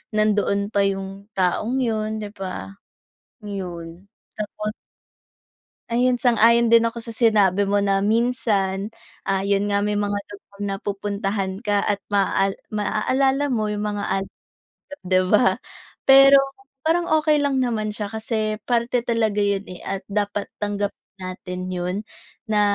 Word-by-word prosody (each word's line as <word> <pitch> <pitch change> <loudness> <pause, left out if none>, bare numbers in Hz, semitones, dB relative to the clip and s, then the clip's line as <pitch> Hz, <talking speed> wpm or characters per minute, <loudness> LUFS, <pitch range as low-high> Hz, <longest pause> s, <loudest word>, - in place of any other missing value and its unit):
nandoon 205 -1 +1
pa 200 -2 +3
yung 195 +1 -5
taong 205 +7 +1
yun, 220 -2 -1
'di 205 - -6
ba? 195 +1 -6 0.7
Yun 180 -3 -7 0.3
tapos. 210 0 -4 1.2
Ayun, 250 +2 +3
sang-ayon 235 -1 +5
din 230 0 +6
ako 230 0 -4
sa 230 - -7
sinabi 205 -4 +3
mo 200 +1 +2
na 195 -1 +2
minsan 210 -4 +1 0.4
ah 195 0 +1
yun 200 0 +1
nga 200 0 +1
may 210 0 0
mga 205 0 0 0.2
lugar 200 0 -14
na 200 -1 -1
pupuntahan 200 -1 -2
ka 205 -2 0
at 205 -2 0
maa 195 -1 +1 0.2
maaalala 265 +7 +1
mo 220 -4 0
'yong 210 0 -2
mga 205 -1 -2
alaala 195 0 -1 0.6
niyo, 285 - -7
di 185 0 +4
ba? 215 +5 +5 0.6
Pero 275 +1 +8 0.4
parang 340 +3 +2
okey 305 -1 +3
lang 280 -2 +1
naman 215 -4 -1
siya 205 -1 -4
kasi 220 -1 -2
parte 240 0 0
talaga 225 -3 +1
yon 200 -1 +1
eh, 180 - -9
at 195 0 -3
dapat 205 0 -2
tanggapin 205 0 -2 0.2
natin 185 0 -6
yon 180 0 -2 0.5
na 210 -1 +3
205 Hz, 140 wpm, -23 LUFS, 195-230 Hz, 1.2 s, Pero